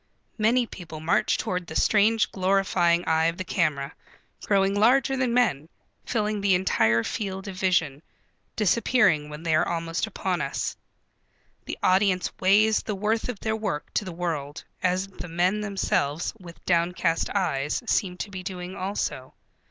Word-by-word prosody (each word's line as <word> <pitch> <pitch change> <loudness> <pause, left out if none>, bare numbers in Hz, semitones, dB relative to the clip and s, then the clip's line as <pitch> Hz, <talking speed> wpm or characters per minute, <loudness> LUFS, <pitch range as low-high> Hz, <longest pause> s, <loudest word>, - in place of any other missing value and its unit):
Many 235 +3 +3
people 165 -7 -9
march 160 +2 +1
toward 180 -1 -3
the - - -8
strange 215 -1 +3
glorifying 185 -2 +2
eye 160 0 +2
of 165 +1 0
the 185 - -3
camera, 155 -6 -1 0.5
growing 195 -1 +2
larger 255 +6 +3
than 260 -2 0
men, 220 - +1 0.4
filling 215 -3 -1
the 195 -2 +3
entire 115 -11 +2
field 195 - -4
of 195 - -6
vision, 175 -7 +1 0.5
disappearing 210 -7 +2
when 150 +2 -8
they 165 -2 0
are 155 - +3
almost 165 +3 -2
upon 190 -4 -2
us. 140 0 -3 0.9
The - - -5
audience 185 -1 +2
weighs 210 +3 +4
the 210 - -4
worth 215 +4 -1
of 230 -5 -5
their 220 0 -1
work 210 -9 -4
to - - 0
the 185 - -6
world 165 -4 -4 0.2
as 185 +1 +1
the 190 -2 -9
men 180 +5 +1
themselves 175 -7 -1
with 170 -3 -13
downcast 170 -1 +1
eyes 150 - 0
seem 185 -5 0
to 205 - -16
be 185 -1 -6
doing 180 0 -6
also. 185 -9 -4
185 Hz, 155 wpm, -25 LUFS, 165-210 Hz, 0.9 s, weighs